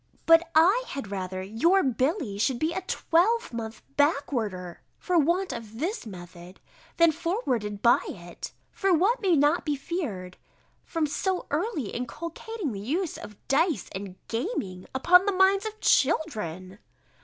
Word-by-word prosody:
But 330 0 +6
I 380 +11 +5
had 245 -8 -6
rather 185 -1 -4
your 330 - +2
Billy 260 - -1
should 250 +3 +1
be 315 +6 -1
a 375 - -2
twelvemonth 335 - 0
backwarder 235 - 0 0.2
for 360 -2 +1
want 340 +2 +1
of 225 -2 -8
this 335 - -3
method, 175 -1 -11 0.4
than 335 -1 +6
forwarded 275 - -2
by 235 - +5
it. 175 -2 -8 0.2
For 390 -1 0
what 395 +9 +3
may 375 -5 +3
not 295 +4 +3
be 295 -2 -1
feared 260 - -5 0.5
from 325 -2 -1
so 365 +5 -1
early 305 - -1
inculcating 335 - -5
the 200 - -5
use 310 - -2
of 210 - -11
dice 305 - +1
and 190 -1 -6
gaming, 225 - -3
upon 360 +8 +5
the - - +4
minds 385 +2 +3
of 435 0 -8
children? 210 - 0
290 Hz, 145 wpm, -27 LUFS, -, 0.5 s, But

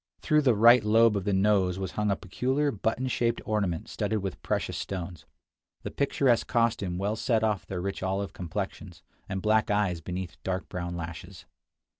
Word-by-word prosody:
Through 150 -1 +3
the 130 -5 +3
right 120 +2 +7
lobe 110 +1 +4
of 100 -2 -2
the 105 - +1
nose 95 -2 +2
was 95 -1 -4
hung 105 0 -1
a 100 - +2
peculiar 130 +10 -1
button 115 +4 -1
shaped 120 -2 0
ornament 100 -7 -1
studded 110 - -2
with 95 - -5
precious - - -2
stones. 85 -5 -5 0.6
This - - -6
picturesque 135 -4 +2
costume 115 -7 0
well 100 +3 -1
set 115 0 +1
off 105 -3 0
their 90 -2 -4
rich 100 +1 -4
olive 95 +1 -2
complexions, 90 -1 -6 0.3
and 95 -1 -3
black 110 0 +3
eyes 100 -5 +1
beneath 90 +1 -6
dark 95 0 -2
brown 85 -1 -4
lashes. 85 +3 -8
100 Hz, 175 wpm, -28 LUFS, 90-110 Hz, 0.6 s, right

